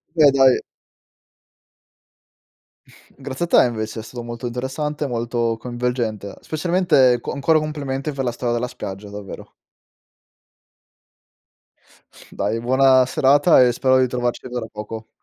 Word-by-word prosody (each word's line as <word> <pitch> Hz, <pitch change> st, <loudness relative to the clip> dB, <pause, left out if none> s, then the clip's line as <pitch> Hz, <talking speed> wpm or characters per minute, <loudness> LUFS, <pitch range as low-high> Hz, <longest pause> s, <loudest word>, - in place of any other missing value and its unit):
Beh, 150 Hz, -3 st, +6 dB
dai 135 Hz, -2 st, +4 dB, 2.6 s
Grazie 135 Hz, +4 st, -4 dB
a -, -, -10 dB
te -, -, +5 dB
invece, 110 Hz, -2 st, -4 dB
è 110 Hz, -, -7 dB
stato 120 Hz, +1 st, -8 dB
molto 120 Hz, +1 st, -7 dB
interessante, 145 Hz, +5 st, -3 dB
molto 115 Hz, -1 st, -2 dB
coinvolgente, 120 Hz, -4 st, -3 dB
specialmente 155 Hz, -7 st, +2 dB
co -, -, -5 dB
ancora 155 Hz, +2 st, +2 dB
complimenti 145 Hz, -2 st, -4 dB
per 135 Hz, -2 st, -4 dB
la 120 Hz, -, -1 dB
storia 120 Hz, 0 st, -2 dB
della 120 Hz, +1 st, -1 dB
spiaggia, 100 Hz, -3 st, -8 dB
davvero. 100 Hz, -1 st, -9 dB, 2.8 s
Dai, 110 Hz, +3 st, -2 dB
buona 130 Hz, +1 st, +4 dB
serata 145 Hz, +4 st, +4 dB
e 125 Hz, -1 st, +4 dB
spero 130 Hz, +1 st, +2 dB
di 130 Hz, -, +3 dB
trovarci 120 Hz, 0 st, -3 dB
tra 125 Hz, -2 st, -4 dB
poco. 110 Hz, +1 st, -8 dB
125 Hz, 120 wpm, -21 LUFS, 120-135 Hz, 2.8 s, Beh